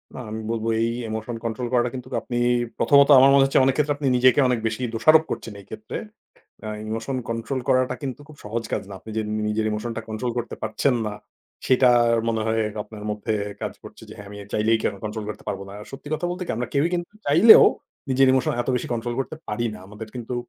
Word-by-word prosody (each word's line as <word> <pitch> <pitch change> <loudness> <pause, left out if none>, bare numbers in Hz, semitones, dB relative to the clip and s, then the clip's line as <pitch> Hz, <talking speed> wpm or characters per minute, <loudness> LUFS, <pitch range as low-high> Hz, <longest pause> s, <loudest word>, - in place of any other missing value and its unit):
না - - -7
আমি 110 +1 -4
বলব 115 -1 -3 0.2
এই 115 - +2 0.2
ইমোশন 110 +2 -4
কন্ট্রোল 120 +2 -3
করাটা 120 0 +2
কিন্তুক 125 - -8
আপনি 120 - -4 0.4
প্রথমত 140 0 +5
আমার 135 +1 +7
মনে 140 -1 +6
হচ্ছে 135 - +3
অনেক 135 - +3
ক্ষেত্রে 150 0 +1
আপনি 145 -1 -2
নিজেকে 130 +3 +5
অনেক 125 -2 +1
বেশি 115 +2 -4
দোষারোপ 155 +8 +5
করছেন 110 - -5
এই - - -19
ক্ষেত্রে। 215 - -6 0.7
আ - - -4 0.2
ইমোশন 115 +4 -3
কন্ট্রোল 115 +3 -3
করাটা 130 -1 +2
কিন্তু 135 -1 -5
খুব 155 - -14
সহজ 115 +3 -3
কাজ - - -1
না। 100 - -8
আপনি 110 - -11
যে 110 - +1
নি 110 - -1
নিজের 110 +1 0
emotion 110 +2 -3
টা - - -2
control 110 +3 -3
করতে 120 -1 -4
পারছেন 110 +5 +1
না 105 - -4 0.5
সেটা 130 0 +5 0.4
মনে 110 -1 0
হয় 110 0 +1 0.2
আপনার 105 0 -11
মধ্যে 105 +1 -2 0.3
কাজ - - -3
করছে - - -13
যে - - -10
হ্যাঁ, 100 -1 -10
আমি 105 - -9 0.2
চাইলেই 110 +1 +2
কেন - - 0
কন্ট্রোল 110 0 -4
করতে - - -9
পারব 100 -1 -3
না। - - -10
আর 105 - -11
সত্যি 135 +2 -9
কথা 160 +3 -2
বলতে 180 +1 -4
কি - - -4
আমরা 120 0 -3
কেউই 145 +4 +3
কিন্তু 175 +1 -4
চাইলেও 170 +11 +8 0.4
নিজের 135 0 +4
ইমোশন 130 -1 +1
এত 120 - -4
বেশি 125 - -3
কন্ট্রোল 120 0 -3
করতে 135 - -4
পারি 120 +3 -1
না। - - -10
আমাদের 105 +2 -9
কিন্তু 125 0 -5
120 Hz, 225 wpm, -23 LUFS, 110-135 Hz, 0.7 s, চাইলেও